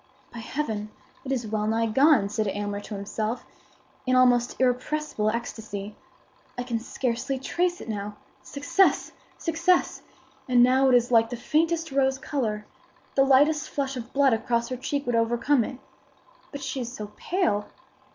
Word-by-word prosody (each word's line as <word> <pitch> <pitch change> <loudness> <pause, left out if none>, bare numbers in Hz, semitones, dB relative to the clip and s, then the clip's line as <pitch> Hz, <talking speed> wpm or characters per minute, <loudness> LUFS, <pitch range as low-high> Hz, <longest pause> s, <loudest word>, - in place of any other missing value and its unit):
"By 235 - -7
Heaven! 220 -4 -3 0.3
it 270 - -5
is 250 -3 -1
well 215 0 -1
nigh 225 +1 +1
gone!" 265 -1 +4
said 215 +1 -1
Aylmer 205 +1 -3
to 205 +1 -7
himself, 215 +3 -3 0.6
in 255 - +3
almost 245 -1 +3
irrepressible 255 -2 0
ecstasy. 215 -3 -5 0.6
"I 245 - -2
can 240 -2 -2
scarcely 250 +3 -2
trace 350 +7 -1
it - - -9
now. 210 -1 -4 0.2
Success! 285 +7 +1 0.3
success! 340 +2 +1 0.5
And 245 -1 +6
now 260 +2 +4
it 250 - +5
is 245 0 +2
like 225 -1 +5
the 245 - -5
faintest 325 +4 0
rose 265 -1 +2
color. 220 -7 -2 0.5
The 270 - +4
lightest 290 +3 +4
flush 275 -1 -2
of 245 0 -7
blood 275 -2 +4
across 235 +1 0
her 255 - -2
cheek 280 +2 -3
would 245 - -1
overcome 235 +3 +2
it. 250 - -6 0.7
But 285 -1 -7
she 270 - -3
is 240 -1 -5
so 210 -4 -7
pale!" 320 - 0
245 Hz, 160 wpm, -26 LUFS, 220-275 Hz, 0.7 s, And